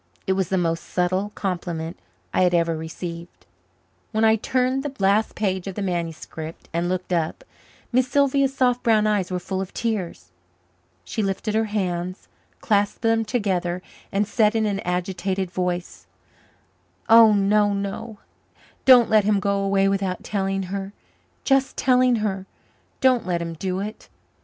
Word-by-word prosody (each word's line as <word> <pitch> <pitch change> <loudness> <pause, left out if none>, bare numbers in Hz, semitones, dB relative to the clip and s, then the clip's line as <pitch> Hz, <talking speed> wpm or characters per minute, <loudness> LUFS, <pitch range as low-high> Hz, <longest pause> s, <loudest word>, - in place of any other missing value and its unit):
It 190 - +2
was 190 -2 -1
the 190 - +1
most 165 -2 0
subtle 185 +3 -1
compliment 175 -3 -3 0.4
I - - +2
had 180 -1 +3
ever 165 -1 +2
received. 170 +2 -7 0.7
When 220 0 +2
I 220 0 +5
turned 255 +4 0
the 280 -1 -5
last 200 +2 +2
page 190 -3 -1
of 195 - -5
the 205 - -3
manuscript 165 -3 -5
and 170 +1 0
looked 185 0 -2
up, 170 - -1 0.5
Miss 255 +1 +2
Sylvia's 275 0 +2
soft 250 -2 +1
brown 220 -2 +3
eyes 205 -4 +1
were 180 - -1
full 190 +1 -3
of 190 - -7
tears. 185 - -3 0.7
She 220 - -3
lifted 195 +1 -2
her 220 +1 +2
hands, 185 -3 -3 0.3
clasped 205 +1 +1
them 225 0 +3
together 185 -6 -1 0.3
and 200 +1 +1
said 215 +1 +2
in 220 -1 +2
an 200 -2 -1
agitated 185 +1 -2
voice: 180 -1 -3 1.0
"Oh, 225 -1 +8
no, 205 +1 +3
no; 200 +2 -4 0.7
don't 250 -3 +8
let 215 -1 +4
him 205 0 +2
go 200 0 0
away 195 0 +2
without 195 -2 -1
telling 195 -1 -1
her 195 0 -4 0.5
just 270 -1 +2
telling 255 -1 +4
her. 195 -2 -3 0.5
Don't 255 -5 +3
let 175 -2 0
him 170 -1 -4
do 185 +3 -3
it!" 210 +2 -7
195 Hz, 155 wpm, -23 LUFS, 180-220 Hz, 1.0 s, Oh